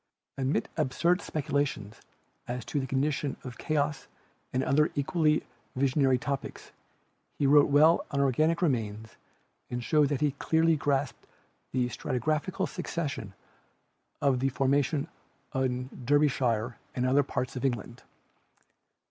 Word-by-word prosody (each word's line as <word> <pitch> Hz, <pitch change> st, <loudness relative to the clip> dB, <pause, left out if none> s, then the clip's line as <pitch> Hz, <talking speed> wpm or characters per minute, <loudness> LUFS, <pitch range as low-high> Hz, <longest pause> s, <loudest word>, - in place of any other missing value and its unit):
Amid 135 Hz, +1 st, 0 dB
absurd 170 Hz, +5 st, +1 dB
speculations 140 Hz, -8 st, -2 dB, 0.5 s
as 125 Hz, 0 st, -4 dB
to 145 Hz, -, -2 dB
the 135 Hz, -, -3 dB
condition 140 Hz, +2 st, -1 dB
of 125 Hz, -2 st, -8 dB
chaos 150 Hz, -1 st, -1 dB, 0.4 s
and 130 Hz, +1 st, 0 dB
other 150 Hz, +4 st, +3 dB
equally 155 Hz, +1 st, +2 dB, 0.3 s
visionary 135 Hz, 0 st, +3 dB
topics, 140 Hz, +2 st, -5 dB, 0.7 s
he 145 Hz, -, +1 dB
wrote 145 Hz, +1 st, +6 dB
well 155 Hz, +4 st, +5 dB
on 140 Hz, -, -2 dB
organic 155 Hz, +6 st, +2 dB
remains 110 Hz, -7 st, -1 dB, 0.5 s
and 120 Hz, 0 st, -3 dB
showed 150 Hz, +1 st, +3 dB
that 145 Hz, -2 st, -1 dB
he 150 Hz, -1 st, +3 dB
clearly 160 Hz, +4 st, +2 dB
grasped 140 Hz, -2 st, -1 dB, 0.4 s
the 125 Hz, -1 st, +1 dB
stratigraphical 155 Hz, -, -1 dB
succession 145 Hz, -, -4 dB, 0.9 s
of 135 Hz, -3 st, +3 dB
the 135 Hz, +1 st, +1 dB
formations 140 Hz, +2 st, +1 dB, 0.5 s
in 125 Hz, -1 st, -1 dB, 0.2 s
Derbyshire 125 Hz, -4 st, +1 dB, 0.2 s
and 125 Hz, -, 0 dB
other 135 Hz, +3 st, +4 dB
parts 130 Hz, -2 st, -3 dB
of 125 Hz, -, -4 dB
England. 120 Hz, -2 st, -2 dB
140 Hz, 120 wpm, -29 LUFS, 125-150 Hz, 0.9 s, wrote